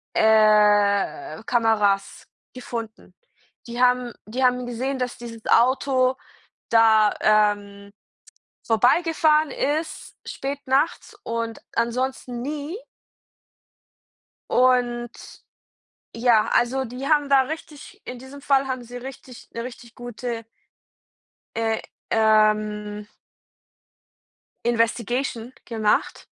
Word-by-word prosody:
äh, 215 - +3
Kameras 210 -4 +1 0.3
gefunden. 230 -3 -7 0.5
Die 240 +1 -4
haben 250 -1 +2
die 250 +5 -3
haben 250 0 +1
gesehen, 255 +3 -3
dass 250 -1 -3
dieses 230 -2 -10
Auto 255 +1 +3 0.5
da, 220 -2 +5
ähm, 205 -1 +1 0.8
vorbeigefahren 305 +6 +3
ist, 310 +3 -3
spät 275 +1 -5
nachts 295 +10 0
und 230 -1 -4
ansonsten 245 +1 -2
nie. 295 +4 -5 1.8
Und, 245 -1 +2 1.0
ja, 230 -2 +3
also, 260 +2 +1
die 250 +4 -6
haben 295 -2 +2
da 275 -1 +6
richtig 315 +5 -9
in 250 -1 -7
diesem 265 +2 -12
Fall 275 -1 +2
haben 255 -2 -4
sie 245 +1 -9
richtig 255 -1 -11
'ne 230 - -5
richtig 240 -1 -10
gute 240 -1 -6 1.1
äh, 225 -1 0 0.3
ähm 215 -1 +2 1.6
Investigation 240 +1 -1
gemacht? 220 -3 0
240 Hz, 90 wpm, -23 LUFS, 220-265 Hz, 1.8 s, da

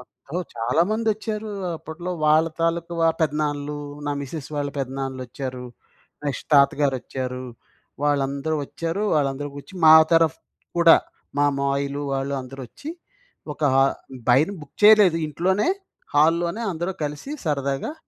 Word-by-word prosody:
అబ్బో! 140 +5 -8 0.2
చాలా 120 +7 +2
మంది 220 +1 0
ఒచ్చారు 215 0 -5 0.3
అప్పట్లో. 165 +3 -7
వాళ్ళ 155 +2 +5
తాలూకా 170 +1 0
వ 165 - +4 0.2
పెదనాన్నలు, 150 -1 -1 0.3
నా 145 - 0
మిసెస్ 140 +1 -6
వాళ్ళ 145 0 -1
పెదనాన్నలు 135 0 -3
ఒచ్చారు. 130 -1 -6 0.6
నెక్స్ట్ 140 - -3
తాతగారు 140 -1 +4
ఒచ్చారు. 130 0 -5 0.6
వాళ్ళందరూ 140 +1 0
ఒచ్చారు. 165 +5 -3
వాళ్ళందరూ 145 -1 0
కూర్చి 145 +7 -11
మా 155 - +10 0.2
తరఫ్ 165 -1 +4 0.4
కూడా 170 -1 +8 0.4
మా 145 - +4
మావయలు 140 +1 -1
వాళ్ళు 135 +1 -1
అందరూ 135 +1 -10
ఒచ్చి 305 - -8 0.6
ఒక 155 - -10
హ - - +4 0.5
బైన్ 145 +11 +4
బుక్ 150 0 -14
చేయలేదు 205 -5 +7
ఇంట్లోనే 185 - 0 0.5
హాల్లోనే 170 +7 +3
అందరూ 175 +3 -3
కలిసి 150 - -5
సరదాగా 140 - -1
150 Hz, 130 wpm, -23 LUFS, 140-170 Hz, 0.6 s, మా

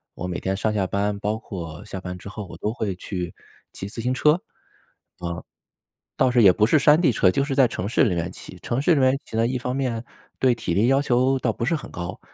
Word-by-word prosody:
我 90 - -5
每 90 -1 -3
天 95 +1 -2
上 110 +1 0
下 100 -3 +1
班， 100 +2 -1
包 105 +2 -1
括 85 -7 -7
下 95 - -6
班 90 0 -6
之 95 - -11
后， 105 0 -6
我 - - -10
都 110 - -2
会 105 -5 -2
去 90 -4 -5 0.4
骑 95 - -6
自 115 +2 -6
行 125 +2 0
车， 150 +3 +4
啊， 175 - -2 1.8
倒 130 -1 +3
是 120 -1 +4
也 95 -2 +8
不 105 - +3
是 150 +6 +4
山 150 +3 +6
地 140 -8 +4
车， 95 -4 +3
就 140 +9 +1
是 140 -1 -2
在 135 -3 +5
城 100 -3 -4
市 130 - +3
里 90 -6 +1
面 85 +2 -2
骑。 90 - -11
城 120 +7 -2
市 165 - +4
里 140 - +2
面 130 +1 +3
骑 110 - -9
呢， 115 +1 +3
一 125 +1 -1
方 125 +1 -3
面 120 -4 -1 0.4
对 125 -2 +4
体 110 -7 -3
力 110 +6 +3
要 135 +1 +4
求 130 0 +2
倒 120 - +1
不 - - -5
是 165 - +1
很 150 - -7
高， 85 +1 -6
110 Hz, 270 characters per minute, -24 LUFS, 95-130 Hz, 1.8 s, 也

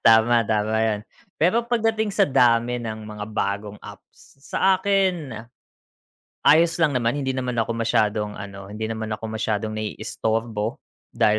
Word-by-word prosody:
Tama, 115 +1 +6
tama 110 0 +1
'yon. 105 -2 0 0.4
Pero 185 +9 +3
pagdating 225 -3 +1
sa - - +3
dami 120 -2 +3
ng 110 -1 -5
mga 105 -1 -6
bagong 100 0 -2
apps, - - -15
saakin 190 - +1 1.1
ayos 165 +2 +6
lang 155 -4 +3
naman 120 +2 +1
hindi 135 - -1
naman 125 -2 -2
ako 115 +1 0
masyadong 105 -2 +1
ano 100 -1 -8
hindi 110 +1 -4
naman 110 0 -4
ako 105 +1 -9
masyadong 110 -1 -2
naiistorbo, 110 +1 -2 0.4
dahil 105 0 +3
115 Hz, 135 wpm, -23 LUFS, 110-145 Hz, 1.1 s, Tama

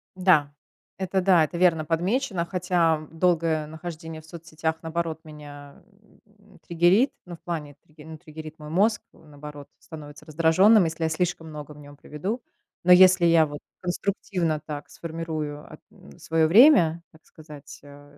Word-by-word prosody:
Да, 170 -6 +2 0.4
это 190 0 -1
да, 180 -3 +4
это 170 +3 -4
верно 170 -3 +3
подмечено, 180 - -1
хотя 170 -3 0
долгое 165 -2 0
нахождение 160 0 -8
в - - -20
соцсетях, 160 0 -5
наоборот, 165 0 -4
меня, 145 +1 -13 0.4
м, 210 0 -24
триггерит. 175 - +2
Ну, 175 -1 -9
в - - -22
плане 150 -5 -6
три 150 -1 -17
ну, 160 0 -10
триггерит 155 0 -11
мой 150 -1 -10
мозг, 205 +6 +1
м, 160 - -20
наоборот, 145 0 -11
становится 150 -1 -12
раздражённым, 170 +6 +4
если 165 0 -4
я 160 - +1
слишком 165 0 -2
много 150 -1 -9
в 150 - -16
нём 145 0 -14
проведу. 190 - -5 0.4
Но 180 - +8
если 185 -1 +6
я 165 -1 +5
вот 145 -1 -8 0.2
конструктивно 180 -3 -2
так 150 -2 -7
сформирую 160 -3 -6
эт - - -13 0.4
своё 160 -1 +1
время, 175 - +5
так 160 -1 -22
сказать, 150 -2 -13
э 145 0 -16
160 Hz, 155 wpm, -24 LUFS, 150-180 Hz, 0.4 s, Но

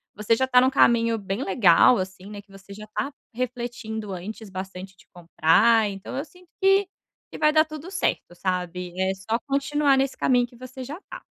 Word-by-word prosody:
você 210 +2 +1
já 260 +2 0
tá 250 -1 +5
em - - +4
um - - +4
caminho 230 -3 +3
bem 195 +6 -4
legal 195 +3 +5
assim, 185 0 -6
né, 205 -1 -8
que 200 - -26
você 195 0 -13
já 215 +1 -10
tá 280 - -2 0.2
refletindo 240 -4 -5
antes 205 +3 -8
bastante 190 0 -8
de - - -21
comprar 200 +6 +3
então 195 +6 -7
eu 285 - -3
sinto 360 +1 -21
que 390 0 +4 0.4
que - - -8
vai 305 0 +3
dar 310 0 +6
tudo 310 +4 -9
certo, 380 - -2
sabe, 180 -1 -3
é 190 0 +1
só 195 +4 -2
continuar 280 0 +2
nesse 270 0 0
caminho 245 -2 +2
que 240 - -20
você 255 +1 -9
já 295 +8 -7
tá. - - -9
230 Hz, 200 wpm, -24 LUFS, 195-270 Hz, 0.4 s, dar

